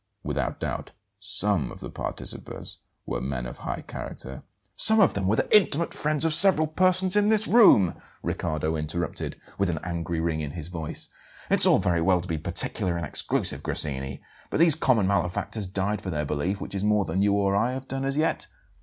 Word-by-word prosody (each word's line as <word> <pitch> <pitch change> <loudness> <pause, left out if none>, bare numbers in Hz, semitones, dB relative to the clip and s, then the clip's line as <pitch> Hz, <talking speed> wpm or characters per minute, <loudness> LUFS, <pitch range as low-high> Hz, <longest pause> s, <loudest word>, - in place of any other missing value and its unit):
Without - - -3
doubt, - - -5 0.3
SOME 100 - 0
of - - -11
the - - -8
participators - - -5 0.3
were - - -4
men 65 -1 -4
of - - -8
high - - -5
character 65 0 -8 0.2
" - - -39
"Some 220 0 +6
of 200 - +4
them 100 -2 -2
were 105 - +2
the - - +1
intimate 170 -5 +2
friends 150 0 0
of 160 - +3
several 170 -2 +7
persons 185 +4 +2
in 205 0 +3
this 220 0 +2
room!" 150 - +6 0.3
Riccardo 80 +1 -2
interrupted, 80 +2 -4 0.2
with 100 -2 +1
an 85 - -2
angry 85 -2 -3
ring 80 -1 -1
in 75 - -4
his 85 -1 -6
voice. 80 -4 -6 0.4
"It's - - +7
all - - +5
very 85 -2 0
well 90 +2 +3
to 90 - -7
be 80 -3 -3
particular 85 +3 +1
and 85 - -3
exclusive, - - -1
Grassini; 70 -2 -1 0.3
but - - -2
these 165 -1 +6
'common 125 -8 +2
malefactors' 100 +1 -1
died 100 +2 -2
for 95 - -6
their 75 -3 -2
belief, 85 +8 -2
which - - -7
is 100 0 -3
more 105 -1 +2
than 90 +4 -1
you 100 0 +2
or 100 -1 +1
I 120 +5 +1
have 130 0 -7
done 135 0 -4
as 135 +1 -1
yet." 160 +1 0
100 Hz, 200 wpm, -25 LUFS, 80-135 Hz, 0.4 s, several